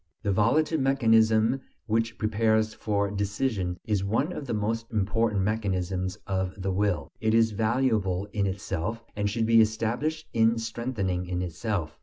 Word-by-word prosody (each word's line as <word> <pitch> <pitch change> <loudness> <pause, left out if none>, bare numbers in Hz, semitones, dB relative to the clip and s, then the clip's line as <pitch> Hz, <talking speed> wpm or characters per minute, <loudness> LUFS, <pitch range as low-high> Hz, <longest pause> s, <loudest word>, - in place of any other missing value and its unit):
The 100 - +1
volitive 150 - +2
mechanism 115 -2 +3 0.2
which 115 0 0
prepares 110 0 +1
for 100 -3 -1
decision 100 -2 -1
is 105 -3 0
one 115 - 0
of 140 - -6
the - - -2
most 115 +2 -2
important 105 -1 +1
mechanisms 95 -3 -1
of 95 0 -2
the 95 +1 -1
will; 100 -1 0
it 110 0 +2
is 115 -1 +4
valuable 110 -4 +1
in 100 -2 +1
itself, 100 +3 -3
and 105 0 0
should 115 +2 0
be 115 0 +6
established 115 +9 -1
and 115 0 +3
strengthened 115 -3 -2
in 90 0 -2
itself. 90 -2 -3
110 Hz, 150 wpm, -27 LUFS, 95-115 Hz, 0.2 s, be